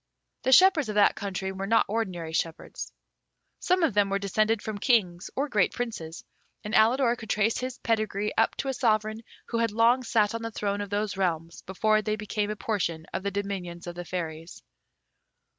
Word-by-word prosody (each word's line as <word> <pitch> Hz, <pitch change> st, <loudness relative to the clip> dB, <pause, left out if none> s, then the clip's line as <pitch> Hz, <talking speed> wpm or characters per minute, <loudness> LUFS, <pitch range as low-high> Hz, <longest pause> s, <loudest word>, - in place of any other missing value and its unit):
The 260 Hz, -, 0 dB
shepherds 335 Hz, -, +6 dB
of 210 Hz, -, -3 dB
that 205 Hz, -, +5 dB
country 190 Hz, -1 st, -3 dB
were 190 Hz, +1 st, -5 dB
not 225 Hz, +2 st, +4 dB
ordinary 185 Hz, -7 st, -3 dB
shepherds. 165 Hz, 0 st, -3 dB, 0.7 s
Some 365 Hz, -1 st, +2 dB
of 315 Hz, -, +2 dB
them 205 Hz, -1 st, +3 dB
were 195 Hz, -, +1 dB
descended 215 Hz, +3 st, +1 dB
from 210 Hz, -1 st, -5 dB
Kings 185 Hz, -8 st, +1 dB
or 280 Hz, +3 st, 0 dB
great 210 Hz, -9 st, +2 dB
Princes, 180 Hz, -9 st, -5 dB, 0.4 s
and 210 Hz, -, -6 dB
Alidor 235 Hz, +2 st, +4 dB
could 225 Hz, -3 st, -11 dB
trace 215 Hz, +2 st, +1 dB
his 255 Hz, 0 st, -4 dB
pedigree 215 Hz, -2 st, -1 dB
up 225 Hz, -, +2 dB
to 275 Hz, -, -4 dB
a 270 Hz, -, 0 dB
Sovereign 215 Hz, -3 st, +1 dB, 0.3 s
who 230 Hz, -, -1 dB
had 230 Hz, 0 st, +2 dB
long 230 Hz, +4 st, +3 dB
sat 215 Hz, -3 st, +2 dB
on 230 Hz, -, -3 dB
the 230 Hz, -, -3 dB
throne 205 Hz, -2 st, -2 dB
of 205 Hz, -, -5 dB
those 205 Hz, 0 st, -2 dB
realms 170 Hz, -3 st, -2 dB
before 215 Hz, +3 st, +1 dB
they 215 Hz, 0 st, -1 dB
became 210 Hz, 0 st, -2 dB
a 210 Hz, -, -2 dB
portion 170 Hz, -7 st, -2 dB
of -, -, -2 dB
the 200 Hz, -, -1 dB
dominions 195 Hz, -4 st, -4 dB
of 175 Hz, -, -5 dB
the 175 Hz, +1 st, -6 dB
Fairies. 165 Hz, -2 st, -6 dB
210 Hz, 190 wpm, -27 LUFS, 190-230 Hz, 0.7 s, shepherds